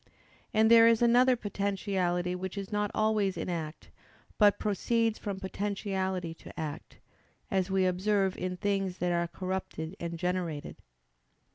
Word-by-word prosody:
And 220 +1 +4
there 230 0 +9
is 230 0 +4
another 250 +2 +5
potentiality 195 -4 -1
which 185 +2 -5
is 195 0 -5
not 210 0 0
always 215 -3 +1
in - - -3
act, 160 -2 -5 0.5
but 205 -2 +6
proceeds 225 +2 0
from 200 -2 -4
potentiality 190 -3 -2
to - - -12
act; 155 -1 -6 0.5
as 190 -1 +1
we 190 -1 +2
observe 190 +1 +1
in 180 0 -3
things 195 -1 -1
that 180 -1 0
are 170 0 +1
corrupted 185 -2 -4
and 170 0 -4
generated. 175 -4 -3
190 Hz, 140 wpm, -30 LUFS, 180-210 Hz, 0.5 s, there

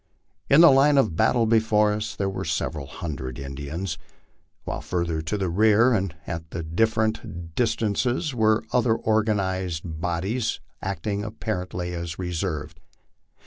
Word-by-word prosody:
In 145 +4 +7
the 170 - +9
line 140 +2 +5
of 110 -12 +3
battle 115 +4 +3
before 110 -2 +3
us 105 0 -3
there 100 - -1
were 95 - -3
several 80 -3 -2
hundred 65 -7 -6
Indians, 70 +7 -5 0.6
while - - -4
further 85 -3 -2
to 80 +7 -2
the 95 -2 -1
rear 110 +7 +4
and 95 -6 -1
at 80 -1 -5 0.3
different 110 -6 0
dis 120 +6 +1
Dances 120 - 0
were 110 -2 +3
other 120 -2 +3
organized 95 -7 0
bodies 90 +8 -2 0.2
acting 100 +2 -2
apparently 90 -5 -4
as 85 -1 -5
reserves. 85 -4 -3
95 Hz, 135 wpm, -25 LUFS, 85-110 Hz, 0.6 s, the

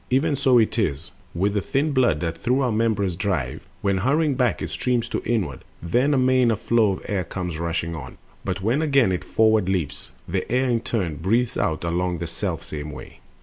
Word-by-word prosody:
Even 140 +4 +2
so 130 -2 +4
it 115 +1 +2
is 75 -6 -1 0.2
With 100 +4 +1
the 105 - +1
thin 145 +9 0
blood 125 - +2
that 85 -1 -3
through 125 +6 +1
our 125 -3 +1
members 105 -5 +1
drives: 90 -10 -2 0.2
When 100 -1 +2
hurrying 145 - +2
back 125 - +1
it - - -4
streams 125 -2 0
to - - -2
inward, 100 - -1 0.2
then 125 - +1
Amain 130 -1 +4
a 115 - +2
flow 110 -1 +2
of - - -8
air 100 -3 -1
comes 90 -2 -5
rushing 85 0 -2
on; 70 -5 -8 0.3
But 95 -1 -3
when 120 +8 +2
again 140 -9 +3
it 90 - -2
forward 110 -4 +3
leaps, 90 -7 -2 0.2
the 95 +3 -3
air 130 +2 +2
In 120 -2 +2
turn 95 -10 -2
breathes 115 +8 +1
out 80 0 -1
along 90 +1 -1
the 85 - -4
selfsame 80 -4 -4
way. - - -11
105 Hz, 200 wpm, -23 LUFS, 85-125 Hz, 0.3 s, so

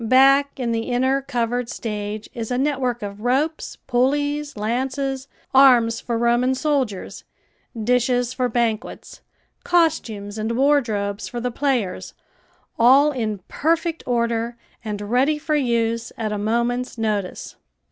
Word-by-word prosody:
Back 275 +4 +4
in 240 -2 -1
the 225 +1 -2
inner 260 +2 +1
covered 245 -2 -2
stage 210 -2 -5
is 230 -3 -5
a 250 - -1
network 260 -4 -1
of 200 0 -6
ropes, 275 +7 -1
pulleys, 285 +3 0
lances, 265 +4 -2 0.3
arms 245 -4 +6
for 235 -1 -2
Roman 240 +2 +2
soldiers, 260 -9 -2 0.6
dishes 245 +1 +1
for 250 -1 0
banquets, 230 -1 -2 0.4
costumes 230 -12 0
and 220 +2 -1
wardrobes 220 -8 +1
for 240 - -5
the 250 +1 -2
players, 245 -7 -2 0.6
all 270 +5 +6
in 220 -7 -3
perfect 330 +2 0
order 235 -1 0 0.3
and 210 -2 -4
ready 255 +8 +2
for 305 +1 -3
use 230 -4 0
at 220 -2 -2
a 210 - -2
moment's 235 +4 -1
notice. 210 -4 -3
245 Hz, 125 wpm, -22 LUFS, 225-270 Hz, 0.6 s, arms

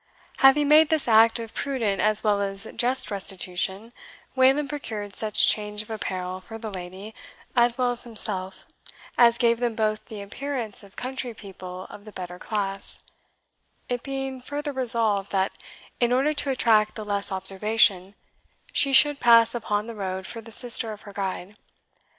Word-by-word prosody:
Having 275 +2 +5
made 305 +1 +6
this 315 -5 0
act 225 0 +5
of 230 -1 -7
prudent 235 -8 -2
as 215 0 +3
well 205 -2 +1
as 195 0 0
just 250 -1 +2
restitution, 195 +2 -2 0.4
Wayland 265 +3 +3
procured 220 -9 -5
such 215 -1 +6
change 210 0 0
of 215 - -13
apparel 185 -3 -5
for 225 +4 -10
the 220 -1 -7
lady, 190 +3 -8 0.4
as 240 0 +4
well 250 -1 +1
as 240 - 0
himself, 200 -5 -2 0.5
as 235 -1 +5
gave 235 -1 +2
them 240 -2 -2
both 215 -1 -1
the 210 -2 -8
appearance 245 0 -4
of 200 -1 -17
country 255 -2 -5
people 185 -3 -10
of 205 - -13
the 215 - -11
better 180 -2 -8
class; 195 -2 -3 0.9
it 245 -1 -2
being 270 -1 -5
further 290 +2 -5
resolved, 225 -6 0
that 190 0 0 0.4
in 240 0 +1
order 270 +5 +2
to 285 -1 0
attract 220 -5 +2
the 215 - -7
less 200 -1 +2
observation, 195 0 +1 0.6
she 275 -1 +3
should 290 +1 +7
pass 230 -1 +5
upon 210 -3 -2
the 230 - -8
road 190 -3 -5
for 230 +3 -6
the 225 +1 -13
sister 230 -1 -1
of 210 - -13
her 205 - -12
guide. 195 0 -5
220 Hz, 165 wpm, -24 LUFS, 200-245 Hz, 0.9 s, should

